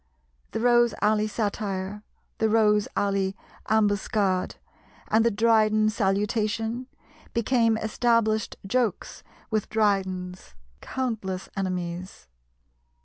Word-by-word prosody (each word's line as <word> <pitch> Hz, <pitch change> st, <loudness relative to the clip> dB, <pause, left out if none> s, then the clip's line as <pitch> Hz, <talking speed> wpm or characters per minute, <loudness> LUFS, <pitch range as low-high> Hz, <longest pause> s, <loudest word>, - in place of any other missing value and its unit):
The -, -, -3 dB
Rose 240 Hz, 0 st, +4 dB
Alley 215 Hz, 0 st, +2 dB
satire, 205 Hz, -2 st, -3 dB, 0.4 s
the 220 Hz, -, +2 dB
Rose 210 Hz, -1 st, +3 dB
Alley 195 Hz, -1 st, 0 dB, 0.3 s
ambuscade, 205 Hz, -3 st, +1 dB, 0.5 s
and 220 Hz, +1 st, +4 dB
the 235 Hz, -, +4 dB
Dryden 215 Hz, -1 st, +3 dB
salutation, 215 Hz, +4 st, -1 dB, 0.5 s
became 230 Hz, -1 st, +2 dB
established 220 Hz, 0 st, +1 dB
jokes 225 Hz, -1 st, -1 dB, 0.3 s
with 215 Hz, -2 st, -1 dB
Dryden's 190 Hz, -, -1 dB, 0.3 s
countless 220 Hz, -8 st, -3 dB
enemies. 180 Hz, -, -4 dB
215 Hz, 85 wpm, -26 LUFS, 195-225 Hz, 0.5 s, Rose